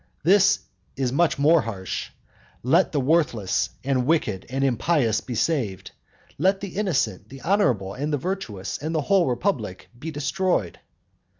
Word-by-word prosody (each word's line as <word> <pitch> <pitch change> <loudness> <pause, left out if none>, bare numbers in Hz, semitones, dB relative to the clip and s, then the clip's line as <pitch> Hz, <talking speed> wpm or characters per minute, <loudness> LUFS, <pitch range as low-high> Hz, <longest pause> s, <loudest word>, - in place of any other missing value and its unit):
This 195 +4 +5 0.3
is 130 -2 -1
much 170 +2 +2
more 155 +3 +5
harsh, 95 -6 -5 0.5
"Let 165 +10 +3
the 145 - 0
worthless, 135 - +1
and 130 -2 0
wicked 115 - 0
and 135 +2 -1
impious 125 -3 +1
be 125 - -6
saved, 110 - -1 0.5
let 190 +4 +3
the 200 -1 -5
innocent, 185 -8 -1
the 135 0 -11
honourable, 125 - +1
the 145 +2 -1
virtuous, 135 - -4
the 155 +1 -1
whole 190 +4 +3
republic 120 - -2
be 160 - -5
destroyed." 155 - -1
140 Hz, 135 wpm, -24 LUFS, 120-170 Hz, 0.5 s, This